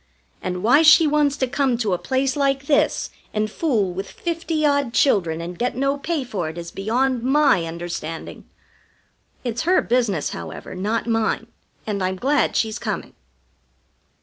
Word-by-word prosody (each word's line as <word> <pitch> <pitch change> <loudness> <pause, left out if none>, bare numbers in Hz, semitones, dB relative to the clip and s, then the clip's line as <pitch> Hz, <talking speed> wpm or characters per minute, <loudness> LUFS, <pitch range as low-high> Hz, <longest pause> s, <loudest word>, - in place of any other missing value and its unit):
And 180 -1 -4
why 255 +8 +6
she 325 +1 +7
wants 295 -2 +2
to 260 - +1
come 260 -1 +1
to 220 -5 0
a 180 - -1
place 265 0 0
like 275 -1 +1
this 285 0 +1 0.2
and 215 0 0
fool 215 - 0
with 195 +2 -5
fifty 330 -2 -2
odd 285 -4 +1
children 170 - +2
and 175 +1 -7
get 245 0 -1
no 275 +2 +1
pay 295 +1 -2
for 195 -10 -3
it 160 - -9
is 170 0 -7
beyond 245 +5 0
my 270 - +3
understanding. 165 -1 -6 1.0
It's 240 -2 -2
her 360 +3 +3
business, 230 -9 0
however, - - -7
not 205 +5 -1
mine, 225 -1 0 0.4
and 200 -3 -2
I'm 185 0 0
glad 275 +10 +1
she's 220 -1 0
coming." - - -4
240 Hz, 160 wpm, -22 LUFS, 190-280 Hz, 1.0 s, she